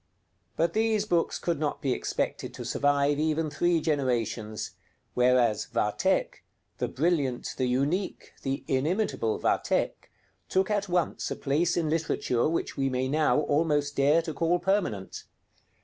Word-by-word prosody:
But 165 +1 +1
these 220 -1 +1
books 175 -5 +1
could 170 -4 -2
not 150 -2 -1
be 135 -2 0
expected - - -3
to - - -7
survive 145 0 +2
even 155 0 0
three 170 +3 +2
generations; 120 -8 -1 0.4
whereas 125 -3 +3
'Vathek,' - - 0 0.4
the - - 0
brilliant, 140 -5 0
the 130 - 0
unique, 140 +10 -1
the 135 0 -3
inimitable 145 - 0
'Vathek,' - - 0 0.4
took 190 +2 +1
at 205 -2 0
once 175 -2 0
a - - -3
place 155 +6 0
in 165 -2 +1
literature 155 -6 0
which 165 - -2
we 135 -1 0
may 130 0 -1
now 150 +1 +2
almost 145 -1 +1
dare 145 +4 +4
to 160 - -4
call 165 +4 +1
permanent. 175 - -1
150 Hz, 140 wpm, -28 LUFS, 130-170 Hz, 0.4 s, dare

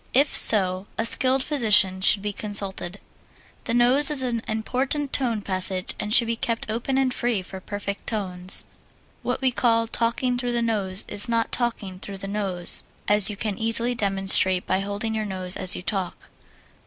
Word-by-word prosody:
If 280 +2 +3
so, 190 -2 +4
a 225 - -1
skilled 260 +3 +4
physician 210 -9 +3
should 195 +1 +5
be 205 0 -3
consulted. 200 -2 -4 0.7
The 235 - -1
nose 255 +5 +5
is 290 -3 0
an 235 -3 -2
important 260 +6 -2
tone 235 -6 -1
passage 185 -1 0
and 210 - -5
should 235 +1 +6
be 230 0 -2
kept 230 -1 -3
open 240 +4 -2
and 265 -2 +1
free 235 -7 -2
for 190 +1 -10
perfect 200 +1 -7
tones. 185 -4 0 0.6
What 250 +1 -3
we 260 -1 +1
call 230 -2 +1
"talking 235 +2 0
through 245 -1 -3
the 240 - 0
nose" 200 -4 -2
is 205 +4 0
not 230 -1 0
talking 215 -6 -3
through 195 0 -6
the 195 - -8
nose, 195 -4 0 0.2
as 205 0 +4
you 205 - -6
can 210 -1 -4
easily 230 +2 0
demonstrate 195 -4 +1
by 190 - -1
holding 205 +3 -4
your 220 -1 -2
nose 185 -2 -3
as 185 - +3
you - - -7
talk. 190 -2 -4
215 Hz, 180 wpm, -23 LUFS, 195-240 Hz, 0.7 s, should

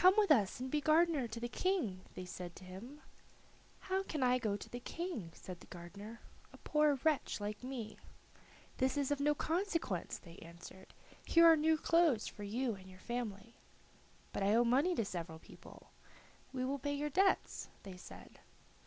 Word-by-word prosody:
"Come 370 +1 +8
with 415 -5 +5
us 215 -6 +4
and 260 +1 -4
be 300 - +1
gardener 310 -4 +4
to 230 +1 -6
the 240 - -2
King," 245 - 0
they 185 - -5
said 180 -1 -7
to - - -11
him. 220 +11 -9 0.8
"How 380 0 0
can 310 -7 -2
I 250 0 +4
go 215 -4 0
to - - -9
the 245 - -6
King," 325 - -4
said 180 -2 -8
the - - -15
gardener, 200 +6 -9 0.3
"a - - -13
poor 300 -1 +3
wretch 310 -7 +1
like 205 +2 -4
me?" 245 -4 -5 0.8
"That 260 +2 +1
is 285 -1 +1
of 290 - +1
no 295 +1 +3
consequence," 330 - -1
they 170 -2 -13
answered. 170 +3 -12 0.3
"Here 335 0 +6
are 330 -1 +9
new 315 +1 +3
clothes 320 -8 +3
for - - -8
you 230 +4 -1
and 190 -1 -11
your 185 - -13
family." 230 0 -4 0.8
"But - - -2
I 200 +2 +4
owe 235 - +6
money 275 +10 +3
to 230 - +1
several 170 -4 -5
people." - - -14 0.6
"We 255 -1 -2
will 275 +2 -1
pay 285 +2 -1
your 295 +1 -2
debts," 385 +5 +2
they 195 -2 -8
said. - - -12
250 Hz, 185 wpm, -36 LUFS, 200-305 Hz, 0.8 s, are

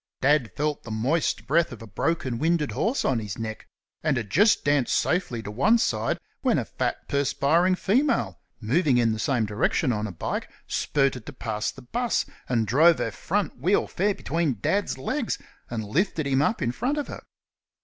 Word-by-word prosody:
Dad 135 -3 +3
felt 150 0 -1
the - - -11
moist 125 +10 0
breath 165 +3 +2
of 115 -3 -9
a - - -8
broken 125 - -1
winded 160 0 +1
horse 245 +5 0
on 125 -3 +2
his 105 -4 -5
neck, 110 -1 -6 0.3
and 150 -4 +1
had 110 -4 -4
just 205 +3 +4
danced 145 -3 +2
safely 125 -11 0
to 105 - -6
one 205 - +4
side 110 - 0 0.2
when - - +2
a - - -1
fat, - - -3
perspiring 145 +6 +2
female, 260 +10 +1 0.2
moving 130 +4 +2
in 115 -2 +3
the 110 - -3
same 120 -2 +1
direction 110 +5 +1
on 105 0 -2
a - - -6
bike, 85 - -4 0.2
spurted 135 -5 0
to 145 - -7
pass 110 -4 -2
the 135 - -10
'bus, 240 - 0 0.2
and 115 -3 +2
drove 155 +10 +5
her - - -2
front 195 -7 -2
wheel 180 +9 +2
fair 200 +2 0
between 160 -7 -1
Dad's 200 - 0
legs, 255 - -2 0.3
and 115 -2 -3
lifted 155 - 0
him 135 0 +2
up 220 +5 +1
in 120 - +1
front 255 - -1
of 295 - -2
her. - - -7
140 Hz, 190 wpm, -26 LUFS, 115-170 Hz, 0.3 s, drove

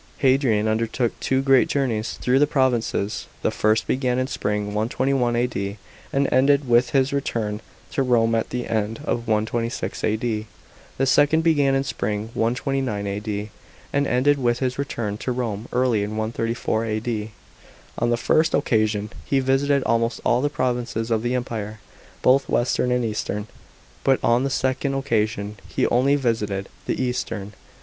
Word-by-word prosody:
§ - - -29
8. 135 - +3
Hadrian 115 -6 +2
undertook 115 +2 0
two 130 0 +1
great 135 -2 +5
journeys 115 -6 -1
through 125 +2 +1
the 145 - +4
provinces. 125 -7 0 0.2
The - - +2
first 110 +1 +2
began 125 -1 0
in 130 - +1
spring 105 -5 -2
121 120 +3 +1
A.D. 105 -4 -1 0.3
and 140 0 +2
ended 140 +2 +4
with 120 +1 +4
his 135 +1 +2
return 110 -6 -2 0.3
to - - 0
Rome 115 -3 +3
at 115 -1 0
the 125 -1 -3
end 110 0 -1
of 120 -4 -2
126 115 +2 -1
A.D. 110 0 -1 0.5
The 135 - +2
second 145 +4 +4
began 145 -4 +3
in 135 - +1
spring 110 -4 -3
129 125 -2 -1
A.D. 105 +1 -4 0.4
and 140 0 +2
ended 140 +4 +3
with 120 -1 +2
his 130 0 -2
return 110 -7 -3
to 130 - -2
Rome 115 -3 -3
early 125 -4 +2
in 105 +1 -3
134 115 0 -1
A.D. 110 0 -2 0.7
On 120 - +1
the 120 - +2
first 160 +7 +2
occasion 110 -2 +1
he 135 - +1
visited 135 +1 +2
almost 115 0 +1
all 120 +1 +3
the 145 - +1
provinces 120 -4 -2
of 110 -1 +2
the 120 +2 -1
Empire, 110 -3 -4 0.4
both 135 +2 +4
western 125 +1 +1
and 125 -1 +1
eastern. 105 -1 -3 0.6
But 135 -1 +3
on 120 +2 +3
the - - 0
second 135 +1 0
occasion 110 -5 -1
he - - 0
only 130 +4 +3
visited 105 -7 -1 0.2
the - - -1
eastern. 115 -5 -3
120 Hz, 160 wpm, -23 LUFS, 110-130 Hz, 0.7 s, great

